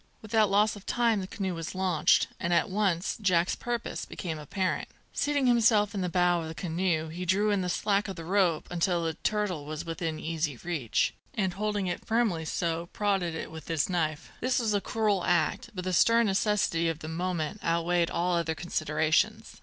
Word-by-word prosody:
Without 215 -1 +2
loss 210 +2 +3
of 205 - -11
time 230 -4 +2
the 185 - -5
canoe 190 -1 -3
was 165 +1 -5
launched, 185 -5 +3
and 170 - -1
at 175 +4 +2
once 190 -3 0
Jack's 180 -3 +2
purpose 240 -1 -3
became 160 -5 -5
apparent. 185 +5 -2 0.3
Seating 290 -2 +1
himself 225 -4 +4
in 200 - -2
the 180 - -1
bow 175 0 +2
of 160 - -5
the 160 - -7
canoe, 165 -2 -1
he 175 +3 -5
drew 200 +4 +2
in 200 -2 +1
the 180 - -2
slack 200 +3 +1
of 195 - -5
the 165 -2 -8
rope 180 -3 +2
until 175 0 +1
the 165 -1 -1
turtle 195 -3 -1
was 155 +3 -5
within 165 -1 -3
easy 160 -4 -2
reach, 155 -10 0 0.2
and, 190 -3 0
holding 205 0 -1
it 175 -1 -3
firmly 220 -8 +1
so, 170 +1 -2
prodded 195 -5 0
it - - -5
with 160 -1 -9
his 165 -1 0
knife. 160 -2 -1
This 255 0 +1
was 225 -4 +1
a 205 - +1
cruel 210 -5 0
act, 175 - +1
but 180 - -4
the 185 0 -2
stern 230 +5 +5
necessity 195 -4 +1
of 165 - -2
the 155 - -8
moment 175 +2 -3
outweighed 170 +1 +1
all 175 +1 0
other 165 -1 0
considerations. 155 -2 0
180 Hz, 195 wpm, -28 LUFS, 165-205 Hz, 0.3 s, stern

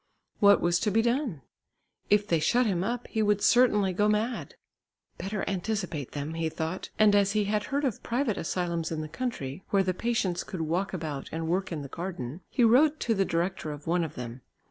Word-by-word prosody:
What 200 -1 +6
was 175 0 +2
to 215 - +1
be 225 +2 +2
done? 235 - -1 0.7
If 205 0 +4
they 170 -5 +2
shut 240 +11 +3
him 185 -5 0
up, 240 +4 -2
he 220 - -1
would 205 -1 +2
certainly 210 -6 +4
go 210 +3 +2
quite 210 - +4
mad. - - -7 0.6
"Better 195 0 -3
anticipate 185 - -3
them," 145 +2 -4
he 165 -1 -1
thought, 160 +3 -4
and 210 -1 +5
as 200 0 +3
he 215 -1 +2
had 210 +1 0
heard 285 +1 -1
of 250 -7 -2
private 240 -2 0
asylums 170 -1 -2
in 160 -1 -2
the 155 - -5
country, 170 - -4
where 195 -1 +3
the 185 -1 0
patients 195 -4 -1
could 185 - -5
walk 175 +5 -1
about 155 -6 -5
and 160 0 -3
work 185 +3 0
in 155 -4 -3
the - - -6
garden, 165 -2 -6
he 245 - +1
wrote 280 +7 +5
to 230 - +1
the 195 -2 +1
director 170 -2 -1
of 145 0 -8
one 175 +1 +1
of 155 -2 -5
them. 125 0 -7
190 Hz, 210 wpm, -28 LUFS, 165-215 Hz, 0.7 s, What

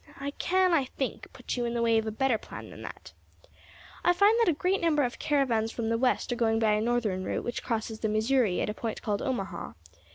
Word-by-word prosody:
I 280 +1 -3
can, 370 +4 +2
I 290 -5 +3
think, 260 0 -5
put - - -5
you 245 -1 -1
in 235 0 -2
the 235 - 0
way 230 -1 +4
of 220 - -4
a - - -1
better 240 0 +1
plan - - -10
than - - -11
that. - - -9 0.9
I 355 - +5
find 405 +5 +5
that 460 -5 +4
a - - +3
great 365 +6 0
number 310 -4 +3
of 245 -1 -3
caravans 240 -7 +1
from 230 -1 -3
the 230 - +1
West 250 -1 +1
are - - +1
going 225 -2 +2
by 220 -1 +3
a 210 - +1
northern 220 -5 0
route - - -2
which 240 - -3
crosses 220 -1 -3
the 220 - -1
Missouri 220 -2 +2
at - - -1
a - - -6
point 225 0 -5
called 205 -2 -1
Omaha. 195 -9 -3
240 Hz, 245 wpm, -28 LUFS, 220-275 Hz, 0.9 s, I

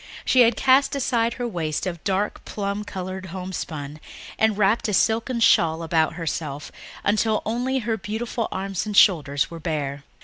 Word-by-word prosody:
She 255 - +5
had 235 -1 +5
cast 270 +1 +4
aside 235 -4 +1
her 245 -1 -3
waist 165 -7 -2
of 170 -3 -5
dark 200 +2 -1
plum 200 0 -3
coloured 190 -1 -6
homespun 165 -5 -6 0.4
and 220 -2 +3
wrapped 210 +3 +2
a 210 - +1
silken 230 +4 +1
shawl 165 -7 +4
about 160 0 +1
herself 150 -3 -4 0.3
until 215 +1 +1
only 245 +4 -1
her 225 -2 -1
beautiful 220 +3 -3
arms 195 +1 -3
and 210 -1 -2
shoulders 145 -7 +4
were 170 - -7
left 165 - -13
bare. 145 -3 -2
195 Hz, 165 wpm, -23 LUFS, 165-225 Hz, 0.4 s, She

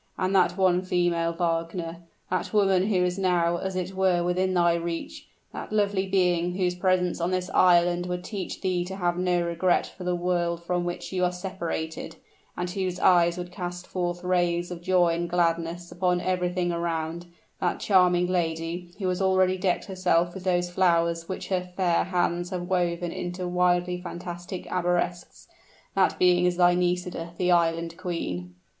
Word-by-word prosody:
And 185 +1 0
that 180 -1 +3
one 185 -2 +3
female, 175 -2 +1
Wagner 165 0 -2 0.3
that 185 - -1
woman 195 -3 +3
who 185 -4 +2
is 180 +1 -2
now 175 -2 +2
as 190 +1 -4
it 185 +1 -3
were 185 -2 +2
within 185 +1 0
thy 170 -1 +4
reach 170 0 -4 0.3
that - - -7
lovely 200 -2 +1
being 180 -2 +1
whose 180 -2 +1
presence 180 -1 +1
on 170 - +1
this 185 0 -2
island 175 0 +4
would 180 0 -3
teach 195 -3 -5
thee 185 -2 0
to 190 +1 -6
have 175 -2 0
no 180 -1 +1
regret 170 +1 +1
for 185 - -10
the 180 0 0
world 175 -1 -1
from 175 0 -1
which 175 +2 -5
you 185 -1 0
are 180 - +2
separated, 180 -3 -5 0.4
and 180 0 -2
whose 185 -2 -2
eyes 175 -1 +4
would 180 0 -6
cast 180 -1 -6
forth 175 -1 -3
rays 175 -1 0
of 175 -1 -6
joy 180 -1 +3
and 170 +1 -2
gladness 170 0 0
upon 180 0 +1
everything 180 -1 -1
around 170 0 -3 0.3
that 180 -2 -1
charming 180 -3 +4
lady, 170 0 -2
who 195 - -2
has 180 +1 -1
already 190 -1 +3
decked 185 -1 0
herself 180 -2 +1
with 190 - -8
those 175 -1 0
flowers 170 -2 +1
which 185 - -5
her 185 -2 +1 0.2
fair 175 -3 +2
hands 175 -1 0
have 180 -2 -3
woven 175 -1 0
into 180 +1 -4
wildly 180 0 +1
fantastic 175 0 -7
arabesques, 175 -1 -2 0.5
that 195 -1 +2
being 180 0 +4
is 175 -1 0
thy 175 -1 +5
Nisida, 180 -1 -1
the 180 -1 +1
Island 165 -1 +1
Queen." 90 - -4
180 Hz, 170 wpm, -26 LUFS, 175-185 Hz, 0.5 s, thy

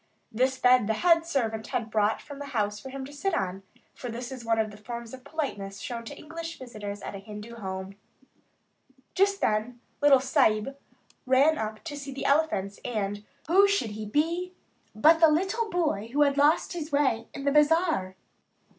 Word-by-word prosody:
This 260 +4 +1
bed 250 -4 +4
the 220 - +1
head 335 +3 +3
servant 225 -8 -1
had 225 -2 -3
brought 215 0 +1
from 285 -1 -10
the 285 - -6
house 210 0 0
for 265 - -9
him 265 0 -6
to 285 - -11
sit 335 +5 -1
on, 190 0 -2 0.3
for 245 - -7
this 240 +2 -6
is 255 -2 -7
one 230 -1 +1
of 220 -1 0
the 205 - -12
forms 235 +2 -7
of 260 -1 -10
politeness 210 -10 -4
shown 235 -1 -5
to 280 +5 -8
English 330 +1 -7
visitors 210 -5 -7
at - - -6
a 200 - -6
Hindu 210 +3 -9
home. 190 -2 -5 1.2
Just 395 +1 +2
then 220 +3 0 0.2
the 290 - -1
"little 275 -2 +7
Sahib" 260 -2 +2 0.5
ran 280 +4 +4
up 215 0 -4
to 310 -3 -6
see 280 -1 -7
the 270 - -5
elephants; 275 -10 +1
and, 205 -3 -3 0.2
who 390 +5 +5
should 400 - 0
he 215 0 -6
be, 335 - 0 0.4
but 315 +9 +6
the 325 -1 +7
little 385 +8 0
boy 300 - -1
who 295 +3 +4
had 280 -1 +2
lost 290 +5 +3
his 320 -2 -5
way 270 -6 +1
in 275 - -6
the 280 - +3
Bazaar. 300 - +3
260 Hz, 190 wpm, -27 LUFS, 215-305 Hz, 1.2 s, little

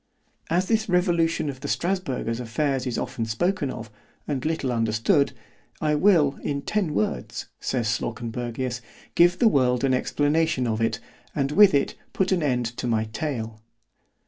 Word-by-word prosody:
As 175 +3 +2
this 220 -2 +1
revolution 170 -3 +2
of 135 -2 -5
the 145 - -6
Strasburgers 165 -11 -1
affairs 130 +2 -1
is 120 - -2
often 125 -4 -3
spoken 145 - 0
of, 115 -3 -7 0.4
and 135 -4 -2
little 155 -5 -1
understood, 115 - +2 0.5
I 150 -1 +1
will, 150 -4 +3
in 140 -1 -2
ten 190 -6 -1
words, 85 - -2
says 120 -3 -1
Slawkenbergius, 120 +3 -3 0.3
give 175 +1 +5
the 235 - +4
world 125 - +2
an 135 -1 +3
explanation 145 +1 +1
of 110 -1 -1
it, 115 0 0 0.4
and 140 -1 0
with 200 +2 +7
it 140 - +1 0.2
put 190 0 0
an 185 -2 +2
end 125 -5 +1
to - - -3
my 110 -2 +1
tale. 115 -8 -4
140 Hz, 155 wpm, -25 LUFS, 120-165 Hz, 0.5 s, with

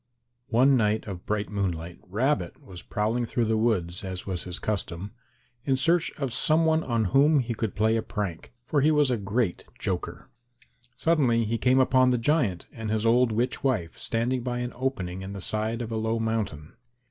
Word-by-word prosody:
One 130 +3 +5
night 110 -2 +1
of 95 -4 -8
bright 105 0 -1
moonlight 90 -4 -3
Rabbit 105 -2 0
was 90 -2 -11
prowling 115 +2 -1
through 120 0 0
the 110 0 +1
woods, 100 -6 0
as 95 -1 -5
was 95 -3 -3
his 90 -1 -3
custom, 100 -2 -3 0.5
in 135 0 +2
search 165 +5 +2
of 135 -5 -3
some 155 +6 +3
one 160 0 +3
on 115 -3 0
whom 145 +3 +5
he 120 -2 -2
could 110 -2 -3
play 110 +2 +2
a 115 - +1
prank, 100 -7 -5
for 145 +1 +1
he 150 - +4
was 150 -3 +3
a - - +2
great 100 -1 -1
joker. - - -4 0.7
Suddenly 130 -8 +2
he 115 +2 -1
came 130 +1 +4
upon 130 0 +4
the 125 - +2
giant 120 - +1
and 110 -1 -6
his 110 0 0
old 120 +1 +4
witch 120 +4 -1
wife 110 -12 0
standing 120 +2 -1
by 120 0 -3
an 125 0 -3
opening 120 -9 -3
in 95 +1 -6
the 100 - -6
side 110 +4 -1
of 115 - -6
a 110 - -1
low 110 +1 0
mountain. 110 -10 -2
115 Hz, 195 wpm, -27 LUFS, 100-130 Hz, 0.7 s, One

